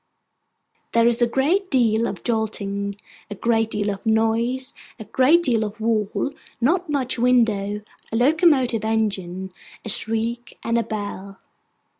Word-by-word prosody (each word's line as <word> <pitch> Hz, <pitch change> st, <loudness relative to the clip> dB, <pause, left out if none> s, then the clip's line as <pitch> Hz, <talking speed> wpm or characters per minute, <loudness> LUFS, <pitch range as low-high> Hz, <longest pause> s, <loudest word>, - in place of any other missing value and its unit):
There 230 Hz, 0 st, +4 dB
is 235 Hz, 0 st, +3 dB
a 240 Hz, -, +4 dB
great 330 Hz, +11 st, +1 dB
deal 230 Hz, -3 st, +2 dB
of -, -, -6 dB
jolting, 200 Hz, -3 st, -2 dB, 0.3 s
a 205 Hz, -, -6 dB
great 225 Hz, +1 st, +1 dB
deal 205 Hz, -1 st, -1 dB
of 195 Hz, -, -7 dB
noise, 230 Hz, +4 st, 0 dB, 0.2 s
a 220 Hz, -, -8 dB
great 275 Hz, -, +3 dB
deal 235 Hz, -7 st, +2 dB
of 215 Hz, +1 st, -6 dB
wall, 220 Hz, +3 st, -1 dB, 0.3 s
not 335 Hz, +8 st, +1 dB
much 260 Hz, -4 st, 0 dB
window, 220 Hz, -5 st, +2 dB, 0.3 s
a -, -, -2 dB
locomotive 260 Hz, -, +3 dB
engine, 190 Hz, -4 st, -2 dB, 0.3 s
a -, -, -3 dB
shriek, 230 Hz, +3 st, +1 dB
and 230 Hz, 0 st, +1 dB
a -, -, 0 dB
bell. 200 Hz, -2 st, -6 dB
225 Hz, 140 wpm, -22 LUFS, 210-250 Hz, 0.3 s, There